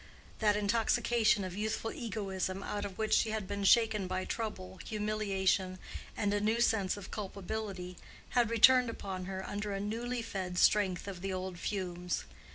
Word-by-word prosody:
That 210 -2 +3
intoxication 220 0 +2
of 185 -1 -5
youthful 220 +2 -2
egoism 195 -4 -3
out 205 0 -3
of 195 -2 -7
which 220 -1 0
she 220 - +4
had 215 -3 -2
been 200 0 -3
shaken 215 -2 +4
by 185 0 -2
trouble, 190 -5 -4
humiliation, 200 -3 0 0.4
and 205 -1 +1
a 205 - +1
new 220 +3 +2
sense 205 -5 +2
of 195 -2 -9
culpability, 195 -2 -5 0.3
had 240 -2 +2
returned 250 +2 +6
upon 190 -4 -5
her 190 0 -5
under 205 0 -3
a 195 - -2
newly 230 +4 -2
fed 185 -5 -4
strength 190 -1 +3
of 185 -3 -6
the 195 0 -2
old 185 -1 -4
fumes. 180 -3 -2
205 Hz, 165 wpm, -32 LUFS, 190-220 Hz, 0.4 s, returned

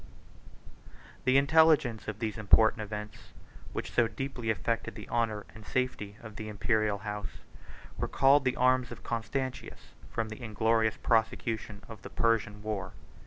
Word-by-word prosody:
] - - -21
The 130 +1 +5
intelligence 140 -5 +4
of 110 -2 -4
these 110 -2 -3
important 110 +1 +5
events, 105 0 -7 0.4
which - - -4
so 120 - +3
deeply 125 -1 -4
affected 115 0 -1
the 105 - -9
honor 115 -3 0
and 110 - -12
safety 105 -4 -2
of 110 -1 -10
the 110 0 -5
Imperial 105 0 +1
house, 105 0 -6 0.6
recalled 135 +2 +4
the 130 -1 +1
arms 130 -1 +3
of - - -9
Constantius 125 +3 -4 0.2
from 115 -1 -2
the 110 +3 -8
inglorious 110 0 +1
prosecution 110 -2 0
of 110 -3 -10
the - - -8
Persian 105 -3 0
war. 105 -4 -3
110 Hz, 145 wpm, -30 LUFS, 105-125 Hz, 0.6 s, The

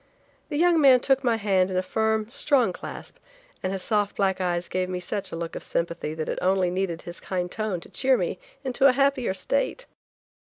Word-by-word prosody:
The 295 - -2
young 340 0 +4
man 265 -3 +7
took 270 +1 +2
my 240 -2 +3
hand 195 -4 +2
in 185 - -2
a 185 - +1
firm, 220 +2 0
strong 250 -4 +2
clasp, - - -9 0.4
and 185 - -2
his 195 -1 -3
soft 210 -2 0
black 190 -1 +1
eyes 175 -1 -1
gave 185 0 -2
me 180 -1 -3
such 195 +3 -4
a - - -4
look 165 0 -5
of - - -5
sympathy 170 -2 -3
that 160 -1 -4
it - - -2
only 185 -1 +2
needed 180 -3 -2
his 175 0 -7
kind 180 -1 -3
tone 215 -5 -2
to - - -9
cheer 260 -1 +2
me - - -2 0.2
into 265 +1 +3
a 260 - +5
happier 270 -6 +1
state. - - -1
200 Hz, 210 wpm, -25 LUFS, 180-260 Hz, 0.4 s, man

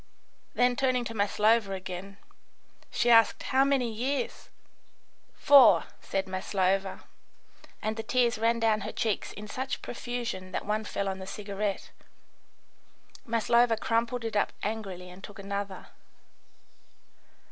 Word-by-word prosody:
Then, 245 0 +3
turning 250 -1 +1
to 230 - -5
Maslova 210 0 +2
again, 190 +1 -7 0.7
she 240 - +2
asked: 225 -1 +5
"How 265 +1 +3
many 275 -3 +2
years?" 260 +5 -3 0.9
"Four," 240 -12 +7 0.2
said 195 0 -2
Maslova, 190 0 -1 0.8
and 220 +1 -2
the - - -2
tears 235 0 +1
ran 230 +1 +2
down 220 -2 +2
her 210 +2 -4
cheeks 220 -3 -2
in 210 +1 -9
such 260 +5 -4
profusion 235 -7 -5
that - - -3
one 215 +1 -1
fell 200 -1 -3
on 190 0 -3
the 190 - -8
cigarette. 200 0 -4 1.4
Maslova 235 0 +3
crumpled 230 +2 -1
it 225 - -4
up 205 - +1
angrily 195 -4 -4
and 185 +2 -14
took 205 - -10
another. 200 -1 -5
215 Hz, 125 wpm, -28 LUFS, 195-235 Hz, 1.4 s, Four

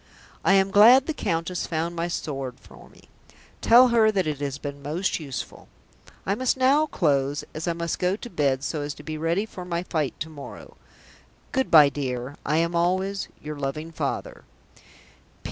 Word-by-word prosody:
I - - +4
am 195 0 +3
glad 235 +7 +7
the 315 - -2
Countess 170 - -2
found 165 +1 -2
my 170 0 -2
sword 135 -7 -5
for - - -16
me; - - -20 0.6
tell 245 +2 +7
her 225 -2 +4
that 195 -3 0
it 150 -3 -3
has 140 -1 -3
been 140 -1 -7
most 160 +8 -2
useful. 140 -5 -7 0.6
"I 195 - +1
must 255 +4 0
now 275 +4 +3
close 145 - 0
as 160 +3 -5
I 170 - +1
must 170 0 -3
go 180 +1 +1
to 240 - -9
bed 140 -5 0
so 150 +1 -2
as 145 0 -4
to 150 - -13
be 155 0 -5
ready 170 +6 0
for 185 -4 -9
my 175 -1 -3
fight 155 -7 -2
to 155 - -3
morrow. 145 -3 -11 0.8
Good 265 -1 0
bye, 150 -3 +8
dear. 130 -1 -4
I 150 +2 0
am 170 +1 +1
always, 185 +3 0 0.2
"YOUR 150 -1 -6
LOVING 155 +4 -4
FATHER. - - -4
165 Hz, 180 wpm, -25 LUFS, 145-195 Hz, 0.8 s, bye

